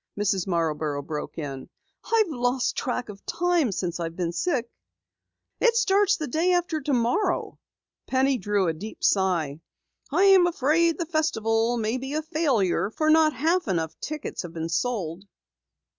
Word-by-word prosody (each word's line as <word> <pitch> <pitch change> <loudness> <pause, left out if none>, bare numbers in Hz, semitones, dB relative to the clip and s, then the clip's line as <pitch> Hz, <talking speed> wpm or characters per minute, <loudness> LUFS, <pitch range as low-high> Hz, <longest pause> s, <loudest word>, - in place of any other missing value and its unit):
Mrs. 195 -3 0
Marborough 155 -4 -1
broke 150 0 -6
in. 140 -4 -6 0.3
"I've 450 -2 +2
lost 245 -2 0
track 250 -2 -3
of 200 -1 -10
time 345 -8 +1
since 180 -2 -3
I've 165 -1 -4
been 175 -2 -2
sick." 255 - -1 0.9
"It 470 -2 +3
starts 405 -3 +3
day 315 +5 0
after 345 -3 0
tomorrow." 270 - 0 0.5
Penny 265 0 +2
drew 200 -1 0
a 165 - +1
deep 210 +8 -9
sigh. 170 -7 +1 0.5
"I'm 375 +3 +5
afraid 330 +1 +2
the 340 - -2
Festival 240 -8 0
may 225 +3 -1
be 265 +2 -5
a 310 - -1
failure, 270 - +1
for 310 +7 +1
not 315 -1 +5
half 335 +3 +1
enough 165 -5 -1
tickets 305 -1 -5
have 175 -2 -8
been 165 0 -4
sold." 185 -3 -2
245 Hz, 145 wpm, -25 LUFS, -, 0.9 s, I'm